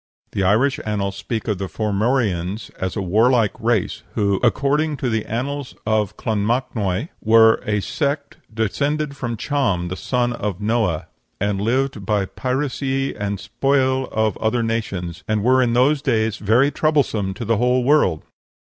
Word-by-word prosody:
The 100 - -2
Irish 110 +9 +2
annals 100 -2 -2
speak 110 +3 -4
of 105 -4 -1
the 95 - -3
Formorians 105 -2 -1
as 95 0 -2
a 100 - -2
warlike 110 +4 +3
race, 115 -4 0
who, 100 -2 +1
according 145 +5 +1
to 125 -3 -1
the 110 -1 -1
"Annals 135 +4 -3
of 105 -2 0
Clonmacnois," 110 - -1
"were 110 0 +6
a 105 -1 +1
sept 140 +5 -2
descended 140 +7 -1
from 120 -4 -4
Cham, 100 -11 0
the 90 - -3
son 120 +3 -1
of 105 -5 -3
Noeh, 105 -6 0 0.3
and 100 0 0
lived 125 0 0
by 100 0 +1
pyracie 135 +3 -2
and 100 -1 -3
spoile 130 +3 +1
of 110 -1 0
other 115 +2 0
nations, 95 -6 -3
and 110 -1 0
were 130 +2 +4
in 120 -2 +2
those 135 +4 +3
days 110 -6 +1
very 115 +8 +3
troublesome 130 -13 +1
to 115 - -5
the 115 0 +2
whole 125 +2 +2
world." 125 - +3
115 Hz, 155 wpm, -21 LUFS, 100-130 Hz, 0.3 s, were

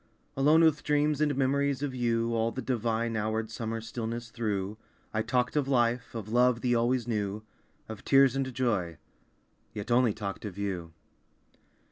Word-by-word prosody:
Alone 150 +4 +5
with 160 -2 +4
dreams 150 0 +1
and 150 -2 +2
memories 140 +1 +1
of 140 -2 -2
you, 115 -2 0
All 115 0 +1
the 130 - -6
divine 115 -2 -1
houred 110 +1 -2
summer 115 0 -3
stillness 115 +1 -5
through 105 -2 -3 0.3
I 110 - +1
talked 125 +3 0
of 145 -3 +1
life, 120 -2 +1
of 110 -3 -5
love 125 +1 +3
the 125 -1 +1
always 120 +1 +1
new, 105 -2 -2 0.4
Of 110 -2 -8
tears, 135 -1 +5
and 135 -1 -1
joy, 110 -10 -1 0.8
yet 105 +2 -5
only 120 -3 +3
talked 100 -2 -5
of 100 -3 -6
you. 95 -5 -3
115 Hz, 160 wpm, -29 LUFS, 110-130 Hz, 0.8 s, Alone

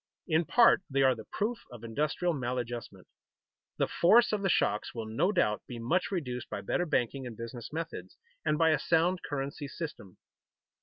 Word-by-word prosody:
In 160 0 +2
part 235 +3 +5
they 135 0 +2
are 130 -1 +5
the 110 -3 -9
proof 230 +3 -1
of 120 -2 -11
industrial 150 +9 0
maladjustment. 120 -3 -4 0.7
The - - +1
force 225 +7 +5
of 210 - 0
the 195 - +1
shocks 105 -9 +1
will 115 -1 -4
no 115 - +1
doubt 105 - +1
be 125 - -7
much 125 +11 0
reduced 125 -10 -3
by - - -4
better 175 - -1
banking 130 -2 0
and 115 -3 -9
business 115 0 -7
methods, 165 +1 -6 0.3
and 150 - +1
by 160 0 +4
a 155 - +2
sound 170 +4 +2
currency 140 +1 -4
system. 140 - -7
145 Hz, 175 wpm, -30 LUFS, 120-170 Hz, 0.7 s, part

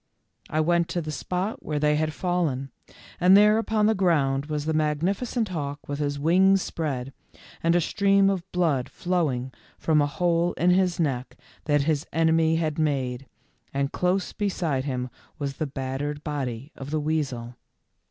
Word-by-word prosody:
I 155 - +1
went 170 +1 +2
to 175 +1 -1
the 155 - -4
spot 185 +7 -3
where 150 - -2
they 150 0 +2
had 155 +1 0
fallen, 155 -7 -1 0.5
and 185 +2 +7
there 210 +1 +6
upon 220 -1 +1
the 220 - +4
ground 145 -8 +1
was. 150 -1 -3
the 160 - 0
magnifi 155 - 0
cent 230 -3 -1
hawk 145 -4 -5
with 145 0 -4
his 145 -1 -1
wings 185 +6 +4
spread, 135 -5 -3 0.5
and 165 +1 +3
a 175 - +4
stream 195 +2 +3
of 195 -1 -1
blood 160 -8 +1
flowing 145 -8 -1 0.3
from 155 -2 +2
a 145 - +2
hole 170 +2 +1
in 180 +1 +2
his 180 -1 +2
neck 130 -6 -2 0.3
that 145 -2 +2
his 150 0 0
enemy 160 0 +3
had 160 -1 -1
made, 135 -4 -1 0.5
and 140 0 0
close 180 +1 0
beside 170 -10 -1
him 125 -3 -3 0.3
was 140 -2 -4
the 155 - -2
battered 140 +2 -4
body 135 -2 -4
of 135 0 -8
the 155 +1 0
weasel. 140 -6 -2
155 Hz, 170 wpm, -25 LUFS, 140-180 Hz, 0.5 s, and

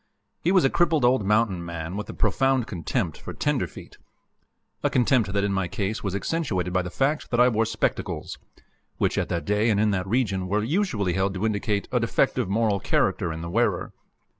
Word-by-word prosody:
He 175 - +3
was 185 -6 +4
a - - +4
crippled 165 -6 +2
old 125 -3 +3
mountain 105 -3 +1
man, 85 +1 -5
with 105 0 -5
a - - -5
profound 130 +4 +2
contempt 85 -9 -3
for - - -7
"tenderfeet," - - -3 0.8
a - - +2
contempt 120 -5 +2
that 100 0 0
in 100 -1 0
my 95 -2 0
case 100 +4 -3
was 100 -2 -2
accentuated 100 - -1
by 90 - +2
the 90 - -5
fact 140 - -1
that 120 - 0
I 125 +1 +6
wore 115 -1 +1
spectacles 110 -1 -2 0.6
which - - +1
at - - -2
that 85 - -2
day 105 +2 +2
and 105 -2 +2
in 105 0 +3
that 95 -1 -1
region 100 -5 0
were 105 +3 0
usually 115 - 0
held 95 +1 0
to 95 +4 -1
indicate 105 -1 -1
a 125 - +2
defective 120 -1 +1
moral 105 -1 +1
character 85 - 0
in 80 0 -5
the 85 - -5
wearer. - - 0
105 Hz, 200 wpm, -25 LUFS, 95-125 Hz, 0.8 s, I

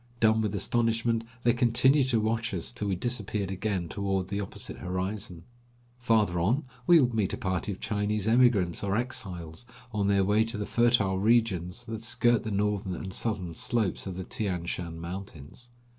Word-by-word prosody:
Dumb 110 0 +4
with 105 -2 -1
astonishment 115 +2 +1 0.2
they 120 - +4
continued 130 +3 +3
to 115 -3 +2
watch 115 0 -1
us 85 - -1
till 105 -4 -4
we 95 - 0
disappeared 105 -2 -2
again 95 -2 -2
toward 95 -1 -2
the 100 0 -2
opposite 100 - -5
horizon. 95 -1 -4 0.6
Farther 110 -7 +2
on 115 - +1 0.2
we 170 -1 +8
would 125 -4 +2
meet 105 -4 0
a - - -2
party 95 +2 -2
of 95 - -7
Chinese 105 0 -1
emigrants 110 -8 +3
or 100 +1 0
exiles, 95 -7 -4 0.3
on 100 -2 0
their 100 -1 +3
way 105 +3 +3
to 115 -1 -3
the 105 - -3
fertile 115 -6 +2
regions 110 -2 +1
that 110 -1 -5
skirt 115 0 +2
the 110 - -4
northern 100 -2 -1
and 95 +2 -6
southern 95 -8 -2
slopes 105 +2 -1
of 95 - -5
the 95 - -4
Tian 90 -4 -3
Shan 85 -1 -4
mountains. 85 - -8
105 Hz, 175 wpm, -28 LUFS, 95-115 Hz, 0.6 s, we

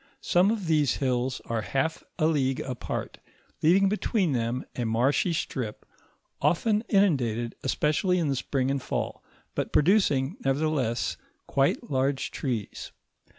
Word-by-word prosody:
Some 180 +3 +3
of 215 -4 -1
these 155 -4 +2
hills 130 -1 -1
are 115 -1 -1
half 135 +8 -1
a 155 - +2
league 135 -5 +1
apart, 130 -2 -5 0.4
leaving 190 +5 +5
between 200 -3 +1
them 120 0 -1
a 125 - -2
marshy 120 +9 +2
strip 125 -8 -3 0.6
often 205 +9 +2
inundated, 125 - +2
especially 155 +7 +1
in 170 -3 +1
the 140 - +1
spring 135 +1 -1
and 140 -1 -1
fall, - - -3 0.3
but - - -2
producing, 155 - +3
nevertheless, 135 -4 0 0.3
quite 140 +2 0
large 135 +1 0
trees. 120 -7 -4
140 Hz, 130 wpm, -27 LUFS, 130-165 Hz, 0.6 s, leaving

